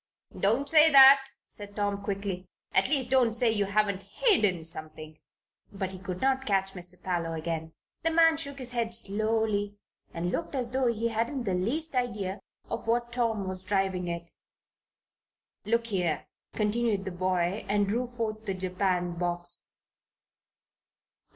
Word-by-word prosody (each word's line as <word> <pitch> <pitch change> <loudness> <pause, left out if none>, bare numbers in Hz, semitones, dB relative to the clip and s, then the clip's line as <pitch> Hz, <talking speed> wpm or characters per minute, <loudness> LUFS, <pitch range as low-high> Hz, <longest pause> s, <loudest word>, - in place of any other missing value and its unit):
"Don't 230 +8 +1
say 310 +1 +7
that," 270 -1 +8 0.2
said 205 -1 -7
Tom, 205 -1 -1
quickly. 195 -2 -4 0.3
"At 190 +5 +3
least, 265 -4 +1
don't 245 -4 +3
say 235 -1 +3
you 205 -2 +1
haven't 200 -1 0
hidden 200 - +2
something." 155 -1 -3 0.5
But 190 -1 -4
he 185 - -7
could 185 -1 -6
not 265 0 +1
catch 195 -1 +1
Mr. 180 0 -4
Parloe 170 -3 -2
again. 160 0 -4 0.3
The 325 - +1
man 325 -1 +4
shook 280 -3 -2
his 255 -2 -3
head 230 -2 0
slowly 215 -1 0 0.3
and 175 +1 -3
looked - - -3
as 245 -3 -2
though 260 0 +1
he 230 +1 -1
hadn't 235 +4 -2
the 195 -5 -1
least 265 - -1
idea 210 -6 -2 0.3
of - - -5
what 240 +1 0
Tom 225 -5 -1
was 185 0 -1
driving 190 -2 -1
at. 170 0 -5 1.3
"Look 230 +2 +1
here," 180 -8 -1 0.3
continued 215 -2 0
the 190 - -3
boy, 185 +2 -1
and 205 0 +2
drew 240 +5 -1
forth 220 -3 -5
the 195 - -1
japanned 180 -2 -1
box. 175 0 -2
205 Hz, 150 wpm, -28 LUFS, 185-240 Hz, 1.3 s, that